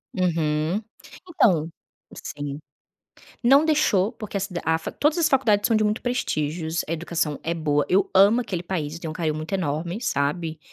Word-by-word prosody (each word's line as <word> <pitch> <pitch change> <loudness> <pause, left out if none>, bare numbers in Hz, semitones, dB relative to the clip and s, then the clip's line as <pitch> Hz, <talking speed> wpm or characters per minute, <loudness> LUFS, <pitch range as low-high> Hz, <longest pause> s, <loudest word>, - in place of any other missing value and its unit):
Uhum. 165 +1 0 0.5
Então 175 - +2 0.5
sim. 145 -1 -6 0.9
Não 275 +5 +6
deixou, 225 -10 +2
porque 215 -4 -7
a - - 0
cid 185 -2 -4
a 160 +1 +2
facu - - -8
todas 300 +3 +2
as 325 -2 +3
faculdades 220 -7 +3
são 225 - +3
de 215 - +2
muito 210 +2 0
prestígios. 160 -9 -2
A 165 - -2
educação 165 -3 -2
é 170 +1 -1
boa, 145 -3 0
eu 195 +1 +2
amo 200 +5 +6
aquele 185 -7 -4
país, 160 -5 -3
eu 165 - -8
tenho 165 - -5
um - - -10
carinho 160 -3 -1
muito 155 +4 -6
enorme, 170 +2 -2
sabe, 160 - -1
175 Hz, 180 wpm, -24 LUFS, 155-210 Hz, 0.9 s, Não